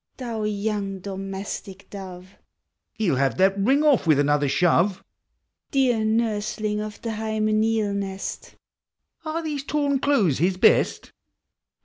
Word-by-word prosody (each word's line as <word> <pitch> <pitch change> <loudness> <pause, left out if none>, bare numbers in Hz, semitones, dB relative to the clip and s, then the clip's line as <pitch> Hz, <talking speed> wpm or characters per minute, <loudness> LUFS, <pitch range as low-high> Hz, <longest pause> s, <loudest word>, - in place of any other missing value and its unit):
Thou 230 -4 -4
young 205 -1 -2
domestic 195 0 -6
dove! 185 -2 -9 0.7
(lie 220 - 0
'11 135 - +1
have 135 -1 +1
that 195 +1 +3
ring 270 +9 +3
oil 290 -5 +4
with 155 -3 +5
another 145 0 +2
shove,) 180 +5 +2 0.7
Dear 250 -5 +2
nursling 215 -1 -1
of 210 -1 -7
the 230 - -2
hymeneal 215 -1 0
nest! 195 -1 -5 0.7
(Are 325 +1 -3
these 295 -3 -3
torn 285 -1 0
clothes 215 - +2
his 180 +3 +1
best?) - - +3
210 Hz, 125 wpm, -24 LUFS, 190-225 Hz, 0.7 s, with